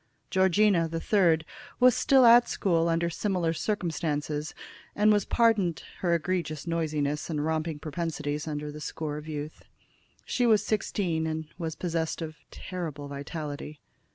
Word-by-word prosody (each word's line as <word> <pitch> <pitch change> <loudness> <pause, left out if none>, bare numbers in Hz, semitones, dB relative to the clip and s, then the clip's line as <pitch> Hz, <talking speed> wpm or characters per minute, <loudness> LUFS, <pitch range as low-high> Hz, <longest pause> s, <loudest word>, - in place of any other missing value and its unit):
Georgina, 190 -2 +3
the 165 0 -3
third, 165 -5 +3 0.3
was 250 -1 +6
still 265 -2 +5
at 235 +1 +7
school 170 -3 +1
under 165 +1 +1
similar 175 -1 -1
circumstances, 155 -5 -2 0.4
and 210 +1 +5
was 205 - +1
pardoned 210 -8 +2 0.2
her 170 -2 +2
egregious 165 -3 -2
noisiness 155 -3 -1
and 150 -2 -1
romping 160 0 -1
propensities 150 -1 -3
under 150 -1 -4
the 150 +1 -9
score 150 0 -4
of 150 +1 -8
youth. 150 0 -6 0.6
She 245 -2 +1
was 215 -3 +4
sixteen, 180 -6 -1
and 160 -1 -4
was 160 -2 -3
possessed 165 -2 -2
of 155 -1 -7
terrible 160 -6 -6
vitality. 145 +1 -6
165 Hz, 140 wpm, -28 LUFS, 150-185 Hz, 0.6 s, at